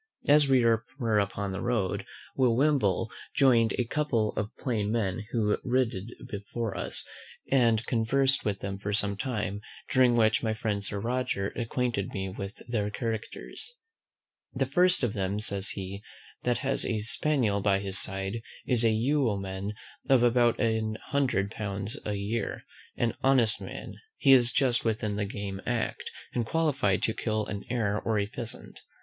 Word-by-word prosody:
As 145 Hz, 0 st, +6 dB
we 130 Hz, -3 st, +4 dB
were 115 Hz, 0 st, +1 dB
upon 100 Hz, 0 st, -2 dB
the 95 Hz, -, -4 dB
road, 110 Hz, -7 st, -1 dB, 0.3 s
Will 125 Hz, -3 st, +3 dB
Wimble 120 Hz, -7 st, +2 dB, 0.2 s
join'd 120 Hz, -5 st, +4 dB
a 125 Hz, -, +2 dB
couple 115 Hz, -5 st, 0 dB
of 105 Hz, 0 st, -2 dB
plain 110 Hz, -5 st, -1 dB
men 105 Hz, -2 st, -1 dB
who 105 Hz, -3 st, +1 dB
rid 125 Hz, -2 st, +1 dB, 0.3 s
before 105 Hz, +1 st, -4 dB
us, -, -, -2 dB, 0.5 s
and 115 Hz, -4 st, +3 dB
conversed 135 Hz, +4 st, +2 dB
with 100 Hz, -2 st, -2 dB
them 95 Hz, 0 st, -4 dB
for 100 Hz, 0 st, -3 dB
some 100 Hz, -1 st, +1 dB
time; 105 Hz, -3 st, -3 dB, 0.3 s
during 125 Hz, -2 st, +5 dB
which 110 Hz, -2 st, +3 dB
my 110 Hz, -2 st, -1 dB
friend 105 Hz, -2 st, -2 dB
Sir 100 Hz, 0 st, -3 dB
Roger 115 Hz, -3 st, -1 dB
acquainted 120 Hz, -3 st, -2 dB
me 95 Hz, -1 st, -2 dB
with 100 Hz, +1 st, -7 dB
their 105 Hz, -4 st, -1 dB
characters. 115 Hz, -, -5 dB, 0.8 s
The -, -, +1 dB
first 180 Hz, -4 st, +3 dB
of 115 Hz, -4 st, +1 dB
them, 100 Hz, +1 st, -1 dB
says 100 Hz, -2 st, +1 dB
he, 100 Hz, 0 st, -6 dB, 0.4 s
that 125 Hz, -1 st, +1 dB
has 135 Hz, 0 st, +1 dB
a 110 Hz, -, -1 dB
spaniel 115 Hz, -2 st, +1 dB
by 100 Hz, -1 st, +3 dB
his 100 Hz, 0 st, +4 dB
side, 95 Hz, +3 st, 0 dB, 0.2 s
is 120 Hz, -2 st, +2 dB
a 115 Hz, -, +5 dB
yeoman 105 Hz, -5 st, 0 dB, 0.4 s
of 130 Hz, -3 st, +5 dB
about 120 Hz, -1 st, +3 dB
an 110 Hz, -2 st, 0 dB
hundred 125 Hz, -8 st, +1 dB
pounds 100 Hz, -1 st, -3 dB
a 105 Hz, -, -1 dB
year, 100 Hz, +3 st, -3 dB, 0.3 s
an 120 Hz, -2 st, +1 dB
honest 125 Hz, -5 st, +3 dB
man: -, -, -7 dB, 0.2 s
he 135 Hz, -, +4 dB
is 125 Hz, -2 st, +6 dB
just 125 Hz, -4 st, +2 dB
within 110 Hz, -2 st, -1 dB
the 105 Hz, 0 st, -1 dB
game 100 Hz, -1 st, -5 dB
act, 120 Hz, -2 st, -2 dB, 0.2 s
and 120 Hz, -, 0 dB
qualified 140 Hz, -, +1 dB
to 110 Hz, -, +2 dB
kill 110 Hz, -1 st, -1 dB
an 100 Hz, -1 st, -5 dB
hare 110 Hz, -4 st, 0 dB
or 110 Hz, -1 st, 0 dB
a 100 Hz, -, +1 dB
pheasant. 115 Hz, +2 st, -4 dB
110 Hz, 160 wpm, -28 LUFS, 100-125 Hz, 0.8 s, As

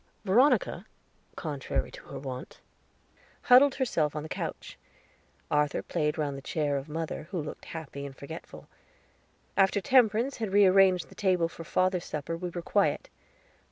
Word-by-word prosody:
Veronica, 245 Hz, +9 st, +3 dB, 0.5 s
contrary 145 Hz, -5 st, -3 dB
to -, -, -11 dB
her -, -, -8 dB
wont, 130 Hz, -2 st, -7 dB, 0.8 s
huddled 265 Hz, +3 st, +6 dB
herself 160 Hz, -, 0 dB
on 150 Hz, -, -3 dB
the 155 Hz, -, -6 dB
sofa. -, -, -3 dB, 1.0 s
Arthur 150 Hz, -1 st, +1 dB
played 150 Hz, 0 st, -1 dB
round 145 Hz, -3 st, -1 dB
the 135 Hz, -, -7 dB
chair 145 Hz, 0 st, -1 dB
of 140 Hz, +2 st, -4 dB
mother, 160 Hz, 0 st, -4 dB
who 185 Hz, -, -3 dB
looked 150 Hz, -1 st, -7 dB
happy 150 Hz, -3 st, -7 dB
and 135 Hz, -2 st, -8 dB
forgetful. 160 Hz, +4 st, -10 dB, 0.9 s
After 195 Hz, +1 st, +3 dB
Temperance 240 Hz, +3 st, +3 dB
had 220 Hz, -4 st, -3 dB
rearranged 190 Hz, -2 st, +5 dB
the -, -, -14 dB
table 185 Hz, -4 st, +1 dB
for 165 Hz, -, -10 dB
father's 185 Hz, +1 st, 0 dB
supper 155 Hz, +2 st, -4 dB
we 180 Hz, +1 st, -4 dB
were 175 Hz, 0 st, -6 dB
quiet. -, -, +1 dB
165 Hz, 150 wpm, -29 LUFS, 150-195 Hz, 1.0 s, huddled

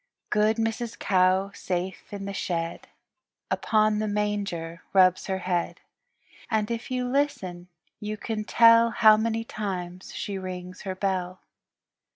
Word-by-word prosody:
Good 215 Hz, +1 st, +3 dB
Mrs. 225 Hz, +1 st, -2 dB
Cow 190 Hz, +1 st, +2 dB
safe 185 Hz, +1 st, -4 dB
in 200 Hz, -1 st, -5 dB
the 200 Hz, -, -4 dB
shed 170 Hz, -3 st, -3 dB, 0.6 s
Upon 215 Hz, -1 st, +2 dB
the 215 Hz, -, -1 dB
manger 200 Hz, -5 st, -2 dB
rubs 185 Hz, -1 st, +4 dB
her 190 Hz, -1 st, -1 dB
head, 180 Hz, -2 st, -2 dB, 0.7 s
And 220 Hz, -1 st, 0 dB
if 230 Hz, 0 st, -4 dB
you 250 Hz, -1 st, -1 dB
listen 200 Hz, -11 st, -1 dB, 0.3 s
you 210 Hz, 0 st, -4 dB
can 215 Hz, 0 st, -3 dB
tell 230 Hz, +1 st, +6 dB
How 220 Hz, -2 st, +6 dB
many 225 Hz, +1 st, -1 dB
times 185 Hz, -5 st, -5 dB
she 200 Hz, -2 st, -4 dB
rings 185 Hz, -1 st, -7 dB
her 185 Hz, -, -2 dB
bell. 185 Hz, -1 st, -2 dB
200 Hz, 135 wpm, -26 LUFS, 185-220 Hz, 0.7 s, tell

